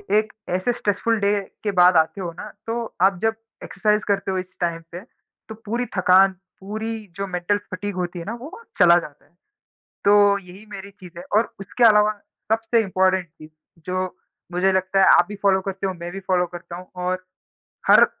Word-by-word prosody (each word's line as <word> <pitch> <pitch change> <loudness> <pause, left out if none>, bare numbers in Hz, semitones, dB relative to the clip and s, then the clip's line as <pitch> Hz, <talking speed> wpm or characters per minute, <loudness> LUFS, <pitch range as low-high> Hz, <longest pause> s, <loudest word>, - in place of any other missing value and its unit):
एक 215 0 +1 0.2
ऐसे 185 +7 0
stressful 225 0 0
day 200 +1 +2 0.3
के 205 - 0
बाद 180 0 +7
आते 160 +5 +1
हो 175 -2 -4
ना, 210 +5 -9 0.2
तो 230 0 -4
आप 190 -2 +4
जब 225 0 +2 0.3
एक्सरसाइज़ 210 +2 0
करते 200 -1 0
हो 190 - -1
इस 185 - -3
टाइम 170 -1 -1
पे, 175 - -6 0.5
तो 220 - -7
पूरी 235 +4 -1
थकान, 185 +1 +5 0.3
पूरी 220 +2 -5
जो 195 0 -3
मेंटल 180 +3 0
फ़ैटिग 205 0 -6
होती 175 -1 -3
है 165 - -7
ना, 220 - -4
वो 250 +6 -8
वहाँ 465 - -11 0.2
चला 175 -2 +7
जाता 150 -4 -12
है। - - -31 0.7
तो 205 0 +5
यही 190 +2 -13
मेरी 200 0 -8
चीज़ 180 -3 -13
है, 175 - -8
और 225 - +1
उसके 220 +5 0
अलावा 210 0 +4 0.4
सबसे 225 +1 +2
इम्पॉर्टेंट 185 -2 +1
चीज़, 155 -1 -15 0.4
जो 185 0 -3 0.4
मुझे 185 +2 +2
लगता 190 +1 +1
है 190 - +6
आप 175 - +4
भी 210 - -6
फ़ॉलो 190 -1 +4
करते 195 0 -4
हो, 190 - -1
मैं 170 0 -7
भी 195 - -6
फ़ॉलो 180 -2 +1
करता 175 0 -8
हूँ 180 +1 -11
और 185 0 -2 0.7
हर - - +8
195 Hz, 200 wpm, -22 LUFS, 180-210 Hz, 0.7 s, हर